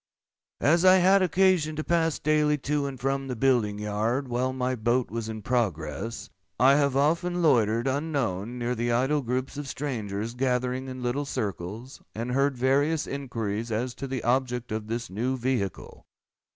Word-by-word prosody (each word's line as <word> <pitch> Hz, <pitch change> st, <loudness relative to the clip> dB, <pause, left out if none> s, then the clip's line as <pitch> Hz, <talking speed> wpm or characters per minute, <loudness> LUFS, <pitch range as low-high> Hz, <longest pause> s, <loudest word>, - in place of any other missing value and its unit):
As 170 Hz, +4 st, +4 dB
I 185 Hz, 0 st, +8 dB
had 190 Hz, +2 st, +5 dB
occasion 180 Hz, -3 st, +2 dB
to 155 Hz, -, -3 dB
pass 165 Hz, -2 st, +1 dB
daily 150 Hz, 0 st, +2 dB
to 145 Hz, 0 st, -1 dB
and 135 Hz, -2 st, -7 dB
from 135 Hz, +1 st, -1 dB
the 130 Hz, -, -3 dB
building 115 Hz, -4 st, +2 dB
yard 110 Hz, +6 st, -1 dB
while 125 Hz, +2 st, 0 dB
my 130 Hz, 0 st, -1 dB
boat 120 Hz, +1 st, 0 dB
was 115 Hz, -1 st, -4 dB
in 110 Hz, -1 st, -6 dB
progress, 100 Hz, -, -2 dB, 0.3 s
I 130 Hz, +3 st, +6 dB
have 140 Hz, -2 st, +2 dB
often 170 Hz, +5 st, +1 dB
loitered, 115 Hz, -5 st, +3 dB
unknown, 130 Hz, -, -2 dB
near 120 Hz, 0 st, -1 dB
the 120 Hz, 0 st, -1 dB
idle 135 Hz, +5 st, +2 dB
groups 130 Hz, +2 st, -3 dB
of 145 Hz, -1 st, -5 dB
strangers 115 Hz, -6 st, -4 dB
gathering 125 Hz, +1 st, -1 dB
in 130 Hz, -1 st, -6 dB
little 130 Hz, +4 st, -1 dB
circles, 110 Hz, 0 st, -5 dB
and 115 Hz, +3 st, -3 dB
heard 135 Hz, +1 st, +1 dB
various 145 Hz, +5 st, +2 dB
inquiries 115 Hz, -5 st, -4 dB
as 120 Hz, +3 st, -1 dB
to 135 Hz, -, -6 dB
the 130 Hz, -2 st, -4 dB
object 125 Hz, -1 st, 0 dB
of 110 Hz, 0 st, -3 dB
this 115 Hz, -2 st, -4 dB
new 125 Hz, +7 st, -1 dB
vehicle. 120 Hz, -7 st, -3 dB
130 Hz, 165 wpm, -27 LUFS, 115-140 Hz, 0.3 s, I